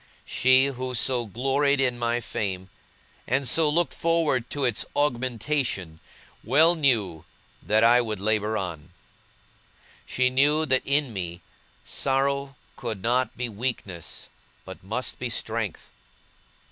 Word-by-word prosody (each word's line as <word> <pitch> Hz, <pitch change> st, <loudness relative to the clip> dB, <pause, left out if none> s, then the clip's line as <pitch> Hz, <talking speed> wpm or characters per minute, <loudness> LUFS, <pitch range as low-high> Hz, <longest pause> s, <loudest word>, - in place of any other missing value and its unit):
She, 130 Hz, +1 st, +4 dB
who 130 Hz, -2 st, -3 dB
so 120 Hz, -1 st, +2 dB
gloried 135 Hz, +6 st, +1 dB
in 125 Hz, -3 st, +1 dB
my 120 Hz, 0 st, 0 dB
fame, 95 Hz, -4 st, -4 dB, 0.6 s
and 135 Hz, +2 st, +1 dB
so 160 Hz, +2 st, +4 dB
looked 170 Hz, +3 st, +1 dB
forward 160 Hz, -7 st, 0 dB
to 145 Hz, -2 st, -1 dB
its 120 Hz, -3 st, +1 dB
augmentation, 120 Hz, -, -1 dB, 0.4 s
well 155 Hz, +9 st, +5 dB
knew 115 Hz, -, +1 dB, 0.4 s
that 110 Hz, +1 st, +2 dB
I 120 Hz, +1 st, +6 dB
would 110 Hz, -4 st, -4 dB
labour 110 Hz, +1 st, 0 dB
on. 85 Hz, -4 st, -5 dB, 1.2 s
She 125 Hz, 0 st, +1 dB
knew 145 Hz, +4 st, +3 dB
that 130 Hz, -3 st, +2 dB
in 140 Hz, -3 st, +1 dB
me, 90 Hz, -2 st, -5 dB, 0.4 s
sorrow 140 Hz, 0 st, 0 dB, 0.2 s
could 110 Hz, -7 st, -5 dB
not 125 Hz, +2 st, 0 dB
be 125 Hz, -, -2 dB
weakness, 105 Hz, -6 st, -4 dB, 0.4 s
but -, -, -10 dB
must 110 Hz, +7 st, -3 dB
be 125 Hz, -, -3 dB
strength. 110 Hz, -4 st, -3 dB
125 Hz, 125 wpm, -25 LUFS, 110-135 Hz, 1.2 s, I